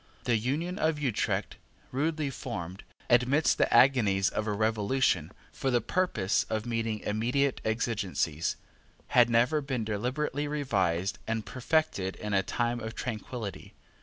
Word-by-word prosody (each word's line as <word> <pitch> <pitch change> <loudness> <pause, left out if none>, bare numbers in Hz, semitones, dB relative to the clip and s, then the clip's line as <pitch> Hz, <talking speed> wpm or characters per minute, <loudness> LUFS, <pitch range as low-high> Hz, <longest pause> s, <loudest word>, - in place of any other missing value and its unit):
The 120 - +2
Union 150 - -1
of 160 -1 +1
Utrecht, 135 -7 -1 0.3
rudely 150 +1 -1
formed, 90 -5 -6 0.2
amidst 125 +5 +3
the - - +3
agonies 105 -8 +5
of 105 - -2
a - - +1
revolution, 105 - +1 0.2
for 135 - -1
the 120 -2 +3
purpose 110 - +1
of 110 -1 -3
meeting 115 -2 -2
immediate 125 +6 0
exigencies, 100 -8 -1 0.5
had 120 -1 +5
never 120 +6 +3
been 135 -5 -2
deliberately 130 +7 -2
revised 100 - 0
and 115 -1 -2
perfected 130 -8 0
in 105 -1 -4
a 95 - +4
time 120 +4 -1
of 110 0 -6
tranquillity. 110 -3 -5
115 Hz, 135 wpm, -29 LUFS, 105-135 Hz, 0.5 s, agonies